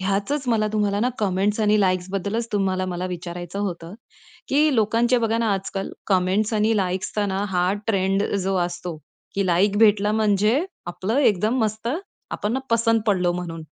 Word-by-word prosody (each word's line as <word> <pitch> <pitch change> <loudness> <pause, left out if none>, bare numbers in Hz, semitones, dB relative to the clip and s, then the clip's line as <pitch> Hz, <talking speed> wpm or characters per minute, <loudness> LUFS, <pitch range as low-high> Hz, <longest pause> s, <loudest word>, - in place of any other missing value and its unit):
ह्यातच 200 +9 -1
मला 220 -2 +2
तुम्हाला 205 -1 +1
ना 245 - +2
कमेंट्स 205 +1 0
आणि 210 0 +3
लाइक्स 185 -2 +1
बद्दलच 200 +4 -2
तुम्हाला 185 -2 -1
विचारायचं 175 +1 -6
होतं, 175 -3 -4 0.5
की 295 +1 +3
लोकांचे 230 +2 +2
बघा 225 -1 0
ना 225 -3 +1
आजकाल 195 0 -4 0.2
कमेंट्स 195 +3 +1
आणि 215 +1 +2
लाइक्सचा 190 +2 -1
ना 195 +1 -1
हा 180 0 +1
ट्रेंड 195 -2 +1 0.2
जो 195 +1 0
असतो, 175 -1 -3 0.4
की 195 -1 0
लाइक 190 +4 +2
भेटला 210 -1 +4
म्हणजे 215 - +2 0.2
आपलं 190 +8 -2
एकदम 220 -2 +2
मस्त, 215 +1 -2 0.4
आपण 210 - -2
ना 260 - 0
पसंत 230 0 +3
पडलो 180 -4 +2
म्हणून. 170 -2 -5
200 Hz, 155 wpm, -23 LUFS, 185-220 Hz, 0.5 s, भेटला